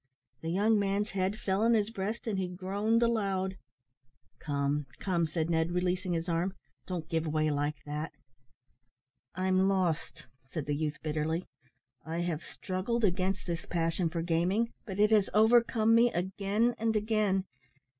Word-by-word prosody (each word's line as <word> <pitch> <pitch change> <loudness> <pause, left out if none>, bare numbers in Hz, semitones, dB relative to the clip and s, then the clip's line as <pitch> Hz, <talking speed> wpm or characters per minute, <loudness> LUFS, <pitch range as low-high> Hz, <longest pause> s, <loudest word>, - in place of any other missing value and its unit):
The 165 - -3
young 210 +5 +3
man's 200 +1 0
head 195 +2 -1
fell 195 -3 0
on 230 +1 +4
his 215 0 +1
breast, 215 +2 -3
and 210 -4 -1
he 185 - -1
groaned 200 +6 0
aloud. 195 -5 0 0.8
"Come, 145 -1 -1
come," 170 -4 +1
said 155 0 -1
Ned, 165 0 +1
releasing 180 0 0
his 165 +1 -2
arm, 175 +3 0 0.3
"don't 175 -4 -4
give 165 0 -1
way 155 0 +1
like 145 +1 0
that." 150 +2 -4 1.2
"I'm 185 +1 +2
lost," 180 -5 -1 0.2
said 155 -2 -4
the 145 - -1
youth, 150 0 -2
bitterly. 155 +3 -1 0.6
"I 165 +2 -3
have 170 -3 -2
struggled 200 +6 -3
against 190 0 +1
this 170 -2 -4
passion 165 0 0
for 165 0 -2
gaming, 180 +7 +1 0.2
but 195 -1 -5
it 210 +1 +5
has 210 -3 +4
overcome 225 0 +5
me 235 +1 +5
again 200 +6 0
and 225 0 +1
again. 210 -3 +1
185 Hz, 155 wpm, -31 LUFS, 165-210 Hz, 1.2 s, it